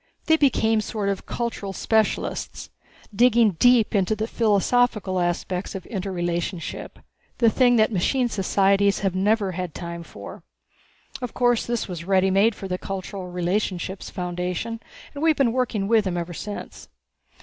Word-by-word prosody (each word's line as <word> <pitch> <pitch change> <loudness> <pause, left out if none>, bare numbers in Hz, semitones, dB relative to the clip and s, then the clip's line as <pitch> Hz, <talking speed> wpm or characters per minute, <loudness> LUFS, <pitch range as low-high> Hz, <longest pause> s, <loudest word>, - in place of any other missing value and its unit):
They 320 - +5
became 225 -7 +2
sort 210 -1 -2
of 195 -1 -3
cultural 230 -5 -3
specialists, 220 +1 -1 0.4
digging 235 -1 +5
deep 245 -2 +5
into 200 +1 +2
the 215 +1 -2
philosophical 215 -3 +1
aspects 180 +2 -2
of 190 - -6
interrelationship 175 -3 -4 0.4
the 230 -2 +4
thing 245 +1 +4
that 220 -1 +3
machine 245 +6 +1
societies 200 -1 +2
never 200 +1 +1
have 180 - -6
had 180 -4 -6
time 170 -1 -6
for. 100 -11 -10 0.8
Of 250 -2 -5
course 245 -2 +2
this 240 -1 -1
was 175 -3 -6
ready 190 0 +3
made 200 +3 +3
for 195 - -7
the 180 -1 -3
Cultural 195 -1 -5
Relationships 180 +1 -2
Foundation, 180 +5 -3 0.3
and 285 - -7
we 325 - +4
have 310 - +2
been 265 -4 +3
working 235 -6 -1
with 220 -1 +3
them 180 -2 -1
ever 175 0 -4
since. 205 +4 -7
200 Hz, 150 wpm, -24 LUFS, 185-230 Hz, 0.8 s, They